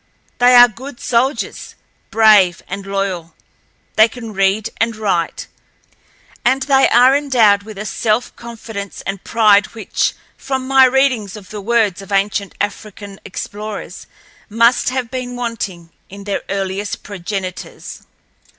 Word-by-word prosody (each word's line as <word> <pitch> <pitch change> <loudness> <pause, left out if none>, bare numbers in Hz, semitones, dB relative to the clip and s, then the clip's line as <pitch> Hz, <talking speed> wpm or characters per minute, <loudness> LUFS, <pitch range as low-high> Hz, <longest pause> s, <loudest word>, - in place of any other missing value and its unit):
They 245 +1 +6
are 245 0 +9
good 245 +3 -10
soldiers—brave 220 - +1
and 195 +1 -6
loyal. 195 -4 -3 0.6
They 220 +1 +7
can 230 -2 -9
read 195 +3 +1
and 230 0 0
write, 195 -6 -2 1.0
and 260 +2 +2
they 270 -1 +4
are 250 +3 +5
endowed 240 -8 +3
with 215 0 -11
a 210 - -5
self 215 +3 -1
confidence 225 -4 -8
and 195 -1 -5
pride 210 -2 +3
which, 220 -3 -1 0.2
from 265 -1 -4
my 270 0 +6
readings 255 -6 +1
of 200 -3 -13
the 210 -1 -6
words 210 -3 +1
of 195 - -12
ancient 200 0 -1
African 205 -1 -5
explorers, 210 +2 -7 0.4
must 230 +4 +3
have 255 -2 -3
been 250 -1 -5
wanting 205 -8 -5 0.2
in 200 +1 -10
their 200 0 -3
earliest 195 +1 -3
progenitors. 190 -1 -6
215 Hz, 130 wpm, -17 LUFS, 200-245 Hz, 1.0 s, are